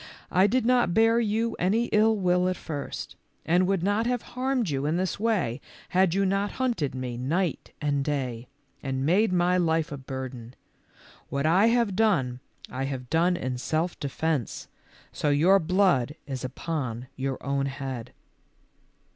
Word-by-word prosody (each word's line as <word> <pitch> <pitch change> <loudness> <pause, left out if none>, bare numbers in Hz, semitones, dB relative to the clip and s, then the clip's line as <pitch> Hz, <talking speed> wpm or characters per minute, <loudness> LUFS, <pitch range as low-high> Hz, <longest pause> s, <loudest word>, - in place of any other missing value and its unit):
I 185 +2 +5
did 245 +2 +1
not 245 -8 +3
bear 225 +1 +5
you 225 +1 0
any 210 +7 +2
ill 220 +1 +4
will 180 -2 +2
at 185 - -1
first, 145 -4 -6 0.3
and 180 +3 +3
would 195 -3 0
not 205 +4 +1
have 245 -2 -1
harmed 255 - 0
you 140 +1 -1
in 160 +3 +1
this 185 +1 -2
way 190 - 0 0.3
had 185 -1 +3
you 195 0 +2
not 195 +2 0
hunted 230 - -1
me 125 -2 -4
night 160 +7 -1
and 145 -2 0
day, 130 -5 -3 0.3
and 135 -1 -2
made 190 +7 +3
my 180 0 +3
life 160 -2 +1
a 145 - -4
burden. 130 -2 -7 0.7
What 140 +1 -1
I 185 +7 +5
have 230 -4 +2
done, 140 - +2 0.3
I 130 +2 -3
have 130 -2 -5
done 175 +2 +3
in 125 -3 -3
self 160 +6 -1
defence, 145 -2 -2 0.4
so 150 - -1
your 170 +7 +5
blood 175 -6 +2
is 135 -3 -5
upon 130 -3 -4
your 135 0 -2
own 140 0 0
head." 135 -3 -5
165 Hz, 160 wpm, -27 LUFS, 135-195 Hz, 0.7 s, I